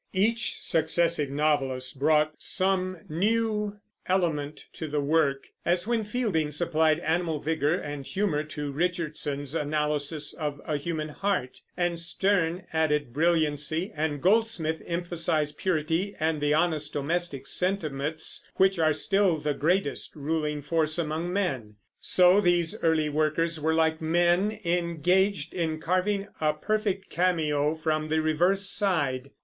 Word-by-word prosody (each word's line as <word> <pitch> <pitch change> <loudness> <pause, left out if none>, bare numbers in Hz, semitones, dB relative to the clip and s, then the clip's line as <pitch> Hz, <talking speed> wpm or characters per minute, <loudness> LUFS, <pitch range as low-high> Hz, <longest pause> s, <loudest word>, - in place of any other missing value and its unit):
Each 220 +4 +1
successive 160 -2 +1
novelist 135 -3 0
brought 155 +1 +3
some 185 -2 0
new 210 +4 0 0.3
element 155 -6 -1
to 160 - -5
the 150 0 -1
work, 140 -2 +1
as 175 +2 +1
when 230 -1 0
Fielding 210 -9 -1
supplied 155 0 +1
animal 165 -2 0
vigor 155 +1 0
and 145 -5 -5
humor 185 -2 -1
to 150 -2 -5
Richardson's 150 -3 -2
analysis 150 -1 0
of 150 -2 -4
a 150 - -1
human 155 +1 -3
heart, 180 -6 -2 0.2
and 175 -1 0
Sterne 175 0 0
added 150 -5 0
brilliancy, 160 - +1
and 150 -1 -2
Goldsmith 190 -6 +2
emphasized 165 -4 -1
purity 175 +2 -1
and 155 -1 0
the 145 0 +2
honest 155 -2 +1
domestic 150 0 -2
sentiments 160 -5 -1
which 190 -1 +3
are 155 -1 +3
still 195 +2 +2
the 150 -1 -1
greatest 165 +1 0
ruling 150 0 -2
force 155 +1 +1
among 165 +1 -2
men. 135 - -2 0.2
So 180 +2 +5
these 175 -3 +2
early 160 -2 +2
workers 155 +2 0
were 160 +1 +1
like 160 0 +1
men 175 +6 +2
engaged 170 0 +1
in 160 -3 -2
carving 190 +4 0
a 155 -1 +2
perfect 200 +1 -2
cameo 155 -4 +1
from 155 -1 -1
the 160 +1 +2
reverse 175 +5 +2
side. 145 -11 0
160 Hz, 130 wpm, -27 LUFS, 150-180 Hz, 0.3 s, So